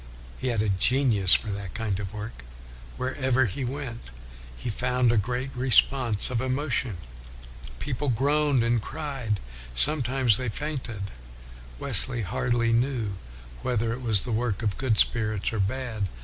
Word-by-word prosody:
He 130 - -2
had 115 -4 +1
a 110 - 0
genius 105 0 +4
for 110 - -2
that 100 -2 -6
kind 105 -3 -2
of 95 -2 -5
work. 105 - -7 0.5
Wherever 130 0 +1
he 120 +6 -4
went 125 - -5 0.5
he 115 - -4
found 125 +1 +1
a - - +2
great 125 +5 -1
response 125 -3 +3
of 120 -2 0
emotion, 130 - -1 0.8
people 140 0 -2
groaned 140 +1 +2
and 115 -1 +1
cried, 135 -7 -4 0.4
sometimes 130 - +3
they 125 -2 -2
fainted; 115 -6 -5 0.7
Wesley 120 - +5
hardly 115 +4 0
knew 120 -4 0 0.5
whether 115 -2 0
it 125 - -6
was 110 -6 +3
the 125 - -4
work 115 -1 -1
of 105 -3 0
good 130 -5 +1
spirits 110 -2 +1
or 110 - -2
bad. 110 -1 -2
120 Hz, 145 wpm, -26 LUFS, 105-130 Hz, 0.8 s, Wesley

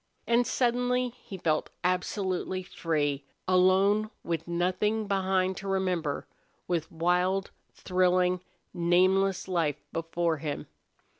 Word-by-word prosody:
And 235 +1 +3
suddenly 250 0 +1
he 230 -5 -10
felt 155 -3 0
absolutely 185 +1 -1
free, 145 -5 -1 0.2
alone, 190 +3 +4
with 165 -1 -3
nothing 185 +5 0
behind 190 -1 +1
to 195 - -6
remember, 185 -6 -1 0.4
with 170 -3 -1
wild, 180 +3 +1 0.2
thrilling, 180 -1 +2 0.3
nameless 185 +2 +2
life 165 -6 0
before 165 0 -1
him. 145 0 -4
185 Hz, 100 wpm, -29 LUFS, 170-195 Hz, 0.4 s, alone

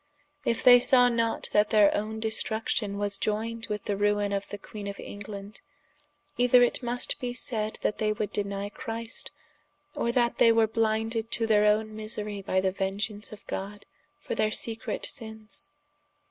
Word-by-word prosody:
If 235 -3 0
they 245 -1 +9
saw 250 -1 +5
not 230 -1 0
that 210 0 +3
their 210 -2 +5
owne 215 +1 -3
destruction 220 -1 -1
was 205 0 -1
ioyned 225 +2 -2
with 210 -1 -3
the 205 - 0
ruine 205 0 +1
of 200 0 -3
the 205 - -5
Queene 205 +1 -8
of 200 0 -6
England, 205 0 -8 0.8
either 245 0 +6
it 245 - +2
must 245 0 -1
be 245 -1 -3
saide 220 -3 -2
that - - 0
they 215 -1 +1
woulde 210 0 -3
denie 200 0 -3
Christ, 230 0 -5 0.6
or 235 - 0
that 240 -1 +1
they 230 - +7
were 225 -1 +4
blinded 225 +1 0
to 230 - +1
their 210 -1 +4
owne 215 +1 +1
miserie 210 -2 -5
by 190 -1 0
the 190 0 +1
vengeance 200 +2 -3
of 215 - -12
God, 205 +1 -6 0.3
for - - -5
their 215 - +1
secret 225 +1 -1
sinnes. 220 -2 -6
215 Hz, 170 wpm, -28 LUFS, 205-230 Hz, 0.8 s, they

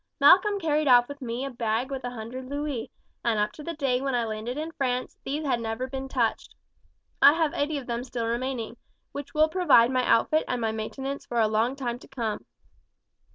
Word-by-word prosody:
Malcolm 385 +8 +6
carried 305 -3 +1
off 245 -1 +6
with 285 0 -9
me 245 +1 -3
a - - -3
bag 235 +2 -1
with 265 -2 -4
a 245 - -2
hundred 245 +2 -7
louis, 285 -3 -3 0.3
and 230 -2 +1
up 210 0 +1
to - - -11
the 335 +2 -5
day 265 -4 0
when 270 -2 -1
I 240 -1 +1
landed 220 +4 -4
in 315 +2 -4
France 255 -4 -2
these 295 +3 -3
had 250 -4 +1
never 225 +2 -3
been 265 0 -5
touched. - - -1 0.7
I 280 +1 +9
have 320 -2 +1
eighty 290 +1 -1
of 275 - -6
them 235 0 -3
still 240 -2 -4
remaining, 235 0 -3 0.3
which 285 +2 -8
will 310 +1 +5
provide 300 -9 +4
my 255 -1 +1
outfit 310 +7 +3
and 250 - -1
my 225 -1 0
maintenance 265 +6 -5
for 240 - -1
a 220 - +4
long 220 +4 +1
time 245 -3 -3
to - - -15
come." 230 -6 -4
255 Hz, 210 wpm, -27 LUFS, 235-285 Hz, 0.7 s, I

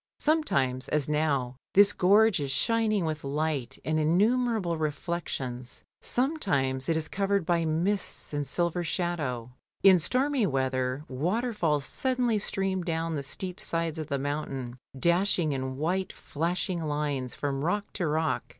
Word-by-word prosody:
Sometimes, 140 - +1
as 150 -3 0
now, 140 -5 0 0.2
this 205 +1 +7
gorge 205 +2 +4
is 140 -2 -2
shining 215 - +2
with 155 -1 -3
light 140 -3 -2
and 155 0 +1
innumerable 205 +3 +2
reflections, 145 -5 -4 0.2
sometimes 175 - 0
it 165 - +3
is 160 0 -2
covered 195 -1 0
by 170 -1 +2
mists 175 +3 -1
and 145 -1 -2
silver 175 +4 0
shadow. 155 -9 -2 0.3
In 190 -2 +8
stormy 255 - +1
weather 130 0 -1
waterfalls 165 - 0
suddenly 250 - 0
stream 195 -2 -1
down 165 -1 -1
the 145 - -2
steep 180 +6 -5
sides 165 -1 -2
of 155 - -4
the 140 -3 -1
mountain, 135 -3 -4 0.2
dashing 170 +1 +2
in 130 -1 -3
white 180 +5 -1
flashing 170 +3 -2
lines 145 -4 -2
from 140 -1 -2
rock 205 +5 -1
to 175 -5 -1
rock. 155 +1 0
160 Hz, 140 wpm, -28 LUFS, 140-190 Hz, 0.3 s, In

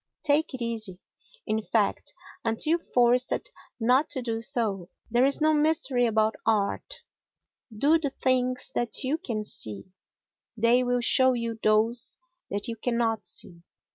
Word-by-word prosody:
Take 295 0 +1
it 250 - -5
easy, 220 -6 -4 0.5
in 215 +1 -1
fact, 210 -1 -1 0.3
until 270 +9 +2
forced 250 - +1 0.3
not 250 +6 +2
to 260 -3 -3
do 225 -1 -3
so. 220 -8 -1 0.2
There 245 +2 +3
is 275 - +3
no 310 0 +3
mystery 295 -5 +2
about 220 0 +1
art. 215 - -1 0.7
Do 285 +10 +2
the 295 -3 -2
things 255 -1 0
that 240 +2 0
you 285 +5 -1
can 230 -11 -4
see; 110 - -1 0.7
they 235 +3 +3
will 245 0 0
show 260 +2 +4
you 230 -2 -4
those 220 +3 +1 0.3
that 205 +3 -2
you 230 -1 -5
cannot 225 -4 -1
see. 170 -1 -2
240 Hz, 140 wpm, -26 LUFS, 220-260 Hz, 0.7 s, show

